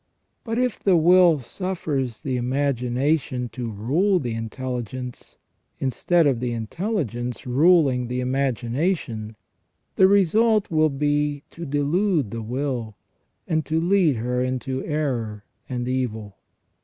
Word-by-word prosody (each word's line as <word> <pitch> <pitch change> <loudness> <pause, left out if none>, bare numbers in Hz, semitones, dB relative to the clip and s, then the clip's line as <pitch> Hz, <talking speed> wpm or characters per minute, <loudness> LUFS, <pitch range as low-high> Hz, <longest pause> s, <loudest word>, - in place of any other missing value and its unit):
But 225 -1 -3
if 250 -2 0
the 190 -3 +3
will 170 -2 +5
suffers 140 - -3
the 130 -2 -1
imagination 130 0 0
to 120 -2 -5
rule 145 - +1
the 125 -8 -2
intelligence, 125 +2 -5 0.4
instead 165 +6 +1
of 135 -5 +2
the 120 -1 -2
intelligence 125 - -3
ruling 135 -2 +3
the 125 +1 -2
imagination, 125 - -1 0.6
the 190 - +7
result 205 +2 +3
will 155 -1 +3
be 145 0 0
to 170 -1 -7
delude 145 - +1
the 115 0 -4
will, 120 -2 -3 0.5
and 160 -1 +1
to 160 +1 +1
lead 175 -4 +3
her 125 +2 -1
into 130 +1 -2
error 120 -9 -2 0.2
and 125 -1 -3
evil. 110 -6 -3
135 Hz, 120 wpm, -23 LUFS, 120-165 Hz, 0.6 s, the